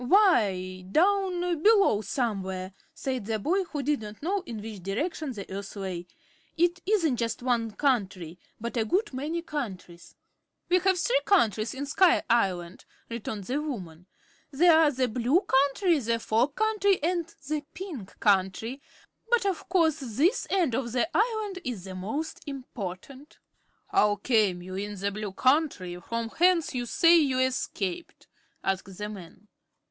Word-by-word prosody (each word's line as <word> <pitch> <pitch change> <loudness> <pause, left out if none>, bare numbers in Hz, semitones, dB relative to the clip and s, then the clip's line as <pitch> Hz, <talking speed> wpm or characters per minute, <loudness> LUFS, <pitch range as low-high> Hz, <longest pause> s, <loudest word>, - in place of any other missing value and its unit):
"Why, 200 - +3
down 360 - +2
below, 400 - +5
somewhere," 190 -6 -3 0.2
said 265 -8 -4
the 220 -1 0
boy, 365 - 0
who 295 -4 -4
did 290 -2 0
not 210 +3 -9
know 390 +4 0
in 225 -2 -5
which 210 -2 -8
direction 280 - -2
the 200 -4 -7
Earth 200 +1 -6
lay. 185 -3 -5 0.5
"It 345 +2 +2
isn't 335 - +2
just 230 +1 -2
one 235 -3 +1
country, 190 - -1 0.2
but 235 +2 -5
a 225 - +3
good 375 - 0
many 310 +6 -3
countries." 190 - -6 0.5
"We 365 +1 +5
have 375 +1 +2
three - - +2
countries 225 - +2
in 280 +2 -4
Sky 350 +5 +4
Island," 185 -6 0 0.2
returned 220 -3 -5
the 265 +9 -2
woman. 180 - -6 0.4
"They 330 +6 +4
are 320 -2 +6
the 260 -2 0
Blue 250 - +2
Country, 285 +4 +2
the 230 -2 0
Fog 235 +5 +1
Country 425 -3 +2
and 340 0 0 0.2
the 305 0 -1
Pink 300 - -8
Country; 205 +6 +1 0.5
but 480 -3 +3
of 385 -1 -2
course 330 -4 +3
this 275 - +1
end 350 -10 +1
of 235 -1 -2
the 255 +5 +2
Island 430 -3 0
is 235 -8 -4
the 190 -1 -7
most 220 +13 -4
important." 260 - -7 0.5
"How 210 0 +3
came 205 -5 +1
you 185 +1 -8
in 205 +2 -4
the 200 +1 -1
Blue 210 0 -5
Country, 255 - +1
from 230 +3 -3
whence 345 +2 +2
you 245 -1 -2
say 335 +6 +5
you 270 -4 +1
escaped?" 255 - -2 0.4
asked 195 -1 -2
the 210 - -4
man. 205 0 -11
255 Hz, 155 wpm, -27 LUFS, 205-335 Hz, 0.5 s, are